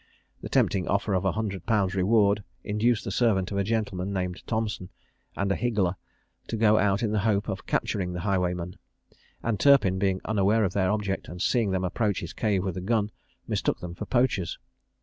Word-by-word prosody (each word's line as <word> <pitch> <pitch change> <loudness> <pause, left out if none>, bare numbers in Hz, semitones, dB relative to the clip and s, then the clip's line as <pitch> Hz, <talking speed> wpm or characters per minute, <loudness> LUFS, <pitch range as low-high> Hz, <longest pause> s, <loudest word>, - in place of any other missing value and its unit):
The - - -6
tempting 95 -3 +2
offer 100 +2 0
of 95 - +2
100_l_. 100 -1 0
reward 100 +1 +3 0.2
induced 110 +2 +1
the - - -4
servant 100 -6 +1
of 100 - -1
a - - +2
gentleman, 100 -3 -1
named 90 -2 -3
Thompson, 110 -5 -2 0.5
and 100 0 0
a - - +2
higgler, 105 -7 0 0.5
to 115 - -3
go 110 -1 +4
out 100 +1 +2
in 110 - 0
the 105 - +1
hope 105 0 +1
of 95 -3 -5
capturing 90 -3 -1
the 90 - -4
highwayman; 90 -3 -1 0.6
and 110 -4 -1
Turpin, 115 -10 +5
being 95 -1 +1
unaware 105 +1 +2
of 95 -3 0
their 95 -2 +2
object, 105 -2 -1
and 90 - -8
seeing 115 +2 +2
them 95 -1 0
approach 100 +2 0
his 85 - -6
cave 100 -4 0
with 95 -3 -3
a - - -3
gun, 105 +1 0 0.4
mistook - - 0
them 90 -1 -6
for - - -6
poachers. 120 -9 +1
100 Hz, 190 wpm, -27 LUFS, 95-110 Hz, 0.6 s, Turpin